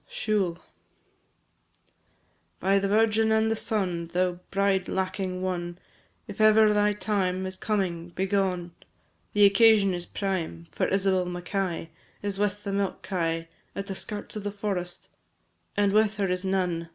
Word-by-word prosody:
SIUBHAL. 210 - -1 2.0
By 195 +1 +3
the 195 - 0
Virgin 220 +1 +3
and 220 0 +3
Son! 190 -7 -1
Thou 180 +1 0
bride 195 -1 +1
lacking 185 -1 -2
one, 175 -2 -3 0.5
If 205 +1 -5
ever 215 0 +6
thy 210 0 +3
time 190 -3 -1
Is 190 0 -4
coming, 185 -5 -2
begone, 185 -1 -1 0.6
The 205 -1 +6
occasion 200 -1 +5
is 175 -1 -5
prime, 175 - -3
For - - 0
Isabel 190 -2 +1
Mackay 175 -1 -3 0.3
Is 200 -1 -2
with 205 0 0
the 200 - -3
milk 195 -1 -2
kye 165 -3 -1 0.3
At 195 - -3
the 195 - -4
skirts 205 +2 -6
of 210 - -4
the 205 - -1
forest, 195 -4 -4 0.7
And 200 -1 +3
with 215 0 +3
her 200 - +1
is 180 +1 -1
none. 180 -3 -1
195 Hz, 140 wpm, -27 LUFS, 180-205 Hz, 2.0 s, ever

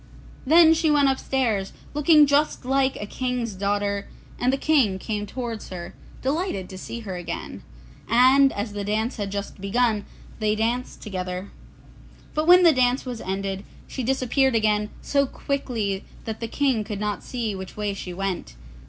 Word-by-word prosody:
Then 325 +2 +7
she 325 0 +1
went 290 -2 +4
upstairs 250 -7 0 0.2
looking 300 +1 +6
just 285 -1 +1
like 270 0 +2
a 205 - -4
King's 250 0 -2
daughter, 200 +1 -1 0.3
and 250 - +2
the 270 - 0
King 270 -12 +3
came 210 +1 -4
towards 235 -1 -5
her, 175 0 -7 0.3
delighted 275 - -1
to 190 - -8
see 235 +5 -6
her 195 -4 -5
again, 175 - -6 0.5
and 260 +4 +6
as 205 +1 -4
the 205 0 -3
dance 220 +5 -1
had 200 -2 -3
just 200 -1 -5
begun, 215 +1 +1 0.3
they 215 -1 +1
danced 235 +3 -2
together. 185 -2 -5 0.8
But 310 +1 -1
when 360 +1 +8
the 335 -2 +7
dance 255 0 +2
was 245 -3 -5
ended, 195 +1 -3 0.2
she 265 - -5
disappeared 265 +1 +1
again 210 -1 +2
so 280 -1 +2
quickly 230 -9 -2 0.2
that 220 -1 -4
the 230 - -3
King 255 -2 +1
could 210 -1 -5
not 210 -1 -2
see 235 -4 -3
which 190 +1 -8
way 210 -1 -1
she 190 -2 -6
went. 190 0 -4
225 Hz, 165 wpm, -24 LUFS, 200-265 Hz, 0.8 s, when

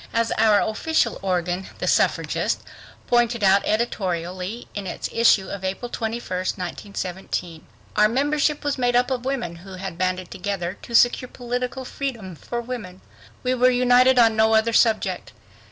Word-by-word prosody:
As 230 0 +1
our 215 -2 +5
official 230 +2 0
organ, 180 0 -1
The - - -3
Suffragist, - - +1 0.4
pointed 240 -2 +2
out 195 +1 +5
editorially, 185 -1 -2
in 200 -2 -5
its - - -4
issue 230 -4 +4
of 200 -1 -6
April 195 +6 -4
21st, 220 -5 -3
1917: 180 -2 -5 0.3
Our 210 0 +5
membership 290 +4 +1
was 290 -2 -1
made 245 -1 +2
up 250 +2 +2
of 250 -1 -2
women 240 -11 -3
who 190 +3 -12
had 185 -2 -7
banded 185 -1 -1
together 190 -2 -3
to 235 - -5
secure 245 +1 +4
political 245 +1 -4
freedom 235 -10 -5
for 235 +9 -5
women. 220 -7 -7 0.4
We 255 0 +1
were 255 0 +4
united 250 +1 +4
on 225 -2 +5
no 220 0 +4
other 225 +1 +2
subject. 220 -5 +1
220 Hz, 155 wpm, -23 LUFS, 185-245 Hz, 0.4 s, our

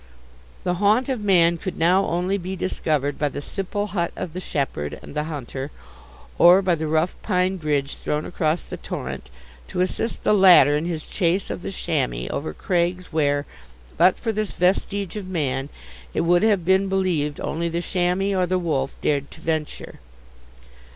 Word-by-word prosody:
The 180 - 0
haunt 220 +6 +3
of 255 -5 -1
man 170 -4 +4
could 185 +1 -5
now 180 +4 +3
only 180 +4 0
be 185 +1 -5
discovered 150 -6 -1
by 150 - +1
the - - -6
simple 195 +6 -3
hut 175 -5 -2
of 165 - -5
the 180 - -4
shepherd 135 - -3
and - - -11
the 150 0 -1
hunter, 140 -3 -5 0.7
or 180 +3 +7
by 185 -2 +2
the 160 -1 -2
rough 160 +3 +1
pine 185 -1 +1
bridge 145 -4 -1
thrown 150 +1 -2
across 160 -1 -1
the - - -7
torrent, 65 - -6 0.4
to - - -5
assist 220 +5 -2
the - - +3
latter 180 -8 +7
in 150 +2 -1
his 165 -3 -3
chase 185 +1 0
of - - -5
the - - -5
chamois - - -1
over - - -3
crags 175 - -1
where, 145 -2 +1 0.5
but 180 +3 +4
for 225 - -2
this 215 -1 -2
vestige 195 +1 0
of 200 -3 -6
man, 140 -6 -2 0.5
it - - +2
would 175 +1 +3
have 205 -5 +2
been 190 +1 +3
believed 175 -7 0
only 170 +1 -2
the 170 +1 -2
chamois 180 +2 0
or 185 -1 +1
the 185 +1 +1
wolf 150 -6 -1
dared 140 -1 0
to - - -13
venture. 160 -2 -4
175 Hz, 180 wpm, -23 LUFS, 150-190 Hz, 0.7 s, or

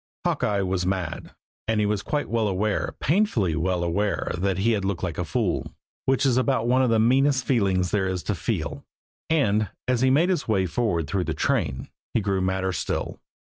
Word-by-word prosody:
Hawkeye 100 -1 +1
was 95 -1 -1
mad; 90 -3 -3 0.3
and 110 -1 +1
he 105 - +2
was 105 -1 0
quite 145 +6 -2
well 115 -2 0
aware, 100 +2 -1
painfully 135 - +1
well 90 +1 0
aware 100 +5 -1
that 95 +1 -1
he 110 +5 +2
had 105 -3 0
looked 95 -2 -2
like 85 -3 -3
a - - 0
fool, 100 -1 -2 0.3
which 135 +1 +2
is 130 -2 +3
about 130 -3 +1
one 130 +2 +3
of 130 - +2
the 115 - +3
meanest 130 +4 +3
feelings 95 -7 +1
there 95 -2 +1
is 95 -1 -2
to 105 - -1
feel; 85 - -3 0.5
and, 110 -10 +2 0.2
as 125 -2 +1
he 130 - +4
made 155 +7 +3
his 180 -6 0
way 100 -4 +2
forward 90 -3 0
through 90 +4 -1
the - - -2
train, 65 -1 -1 0.3
he - - +4
grew 100 -2 0
madder 95 0 0
still. - - -3
105 Hz, 200 wpm, -25 LUFS, 95-125 Hz, 0.5 s, he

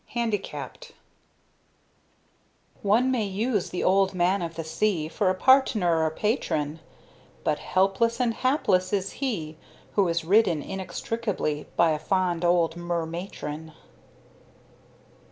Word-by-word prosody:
HANDICAPPED 235 - -3 1.9
One 230 +6 +3
may 235 -5 +1
use 205 +1 -1
the 180 - -3
Old 195 0 +3
Man 180 +2 +2
of 165 -1 -4
the 165 - -4
Sea, 160 0 0
For 190 +4 0
a 185 - +1
partner 205 -9 +4
or 160 - +2
patron, 160 - -1 0.6
But - - 0
helpless 195 +6 +1
and 240 -2 +1
hapless 210 -9 +1
is 195 -1 0
he 165 - -3 0.4
Who 200 -3 +3
is 170 -1 -1
ridden, 180 -5 +3
inextricably, 190 -3 -3
By 170 -1 +4
a 155 - -1
fond 180 0 0
old 170 -2 +2
mer 175 -1 -2
matron. 160 -2 -6
185 Hz, 120 wpm, -26 LUFS, 165-215 Hz, 1.9 s, partner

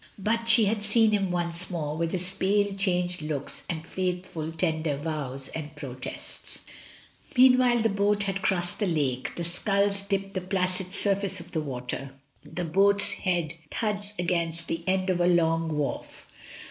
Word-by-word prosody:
But 230 +3 0
she 230 -1 +6
had 210 +1 0
seen 215 +1 +4
him 200 -3 +1
once 175 0 -1
more, 155 -5 -2
with 165 +1 -1
his 185 0 -1
pale, 200 +1 +1
changed 180 -3 0
looks 150 -2 -3
and 160 -2 -3
faithful 180 -3 -3
tender 160 -2 0
vows 140 -3 -4
and 155 -1 -6
pro 140 -4 -6
tests. 125 0 -7 0.8
Meanwhile 250 -2 +6
the 225 - +4
boat 205 +1 +2
has 195 -1 -1
crossed 180 -2 0
the 205 - +1
lake, 140 -7 -1
the 170 - -3
sculls 200 +3 +1
dip 195 0 -2
the 185 - -2
placid 185 0 -1
surface 195 -1 0
of 170 +1 -10
the 160 - -1
water, 135 -1 -5 0.3
the 180 - -4
boat's 200 +4 +4
head 175 -4 -1 0.2
thuds 205 -2 -1
against 170 -2 -1
the 165 0 -3
end 185 0 +2
of 175 -1 0
a 175 - +4
long 165 -2 +2
wharf. 145 -2 -4
180 Hz, 165 wpm, -27 LUFS, 160-200 Hz, 0.8 s, she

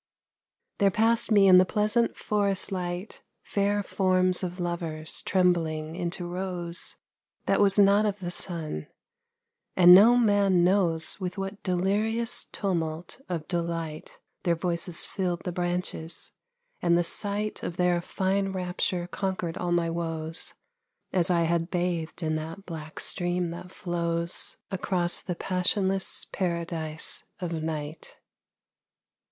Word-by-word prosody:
There 200 - +5
passed 225 +3 +3
me 205 -3 +6
in 185 -1 +9
the - - +7
pleasant 210 +4 +1
forest 200 -3 0
light 180 +1 -4 0.2
Fair 205 0 0
forms 185 -1 +2
of 180 0 -4
lovers 165 -3 -3
trembling 165 -4 +1
into 175 0 -3
rose 175 -1 -4 0.5
That - - +2
was 200 -1 +5
not 205 +1 +5
of 205 -1 -2
the 175 -3 -5
sun, 160 - -2 0.9
and 180 -1 +9
no 220 +6 +8
man 200 -6 +4
knows 175 -3 +1
With 185 -1 -4
what 195 +1 -5
delirious 210 +5 +1
tumult 170 0 -3
of 165 -4 -3
delight 165 -3 -4 0.2
Their 170 -1 +1
voices 170 0 -1
filled 180 -3 -2
the 180 - -3
branches, 175 -2 -2 0.5
and 170 0 +3
the 175 - +2
sight 205 +4 -2
Of 175 - -5
their 180 -1 +2
fine 195 +2 -1
rapture 180 -1 -1
conquered 185 -2 -3
all 175 -1 -2
my 170 -1 +1
woes, 165 -1 -4 0.6
As 180 -2 +4
I 175 -2 +3
had 165 0 0
bathed 175 -2 -2
in 155 0 0
that 165 +5 -7
black 155 -2 -7
stream 175 -1 0
that 180 +1 -8
flows 170 -1 -2
Across 180 -2 0
the 180 - -4
passionless 190 +2 +1
paradise 165 -3 -2 0.2
of 175 -3 -3
night. 155 -1 -5
180 Hz, 130 wpm, -27 LUFS, 170-195 Hz, 0.9 s, in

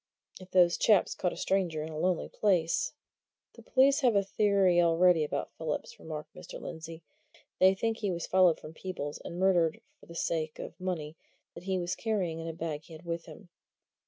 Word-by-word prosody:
"If 185 0 -12
those 175 -2 +4
chaps 210 -4 +4
caught 180 - -1
a - - -8
stranger 175 -5 0
in 160 - -6
a 155 - -7
lonely 180 0 0
place 180 -6 +1 0.3
" - - -63
"The - - -14
police 270 +2 +4
have 250 -6 +3
a 200 - +4
theory 195 -3 +3
already 170 0 +4
about 150 - -3
Phillips," 160 -2 -4
remarked 155 -1 -7
Mr. - - -9
Lindsey. 160 0 -8 0.6
"They 190 +1 +6
think 225 +3 -1
he 210 -3 -2
was 170 -2 -2
followed 185 -3 +4
from 155 - -10
Peebles, 160 -5 -5
and 170 - -7
murdered 175 -4 +2 0.2
for - - -18
the 170 - -11
sake 160 -2 -2
of - - -7
money 165 -4 -4 0.4
that 170 - -11
he 190 -1 0
was 175 0 -2
carrying 190 -8 -1
in 165 - -5
a - - -2
bag 160 -2 -4
he 165 - -13
had 160 +2 -12
with 170 0 -4
him. 185 - -13
175 Hz, 200 wpm, -30 LUFS, 160-190 Hz, 0.6 s, They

